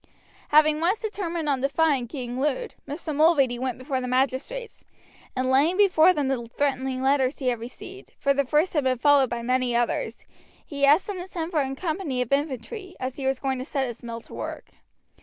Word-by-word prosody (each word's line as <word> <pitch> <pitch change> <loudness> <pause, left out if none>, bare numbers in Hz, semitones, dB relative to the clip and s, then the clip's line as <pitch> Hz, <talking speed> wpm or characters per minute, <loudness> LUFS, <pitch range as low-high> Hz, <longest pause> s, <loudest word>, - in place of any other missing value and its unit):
Having 305 0 +5
once 360 +6 +1
determined 345 -7 -3
upon 275 -3 +1
defying 280 -2 +1
King 250 -1 -5
Lud, 300 - -1
Mr. 300 +1 -5
Mulready 280 -6 +3
went 255 -1 -2
before 260 0 -3
the 250 - -4
magistrates, 265 - -2 0.5
and 255 0 0
laying 300 +8 +3
before 370 -4 +6
them 295 -6 -1
the 265 -3 -1
threatening 265 -2 0
letters 270 0 +2
he 260 -3 0
had 240 -2 -1
received, 360 - -10
for 280 - +2
the 280 0 +1
first 300 +6 +1
had 295 -4 +1
been 255 -1 +2
followed 280 0 +4
by 235 -1 -4
many 250 0 +1
others, 240 0 -1 0.4
he 280 -2 +1
asked 300 +6 +5
them 405 -2 -5
to 355 - -6
send 340 -2 -4
for 310 -4 +2
a 270 0 -3
company 315 -4 -3
of 250 0 -2
infantry, 305 - -2
as 255 0 -4
he 270 -2 -2
was 265 0 +1
going 265 -1 -2
to - - -3
set 275 -1 -2
his 240 -2 -7
mill 230 -1 -6
to - - -16
work. - - -6
275 Hz, 205 wpm, -25 LUFS, 255-320 Hz, 0.5 s, before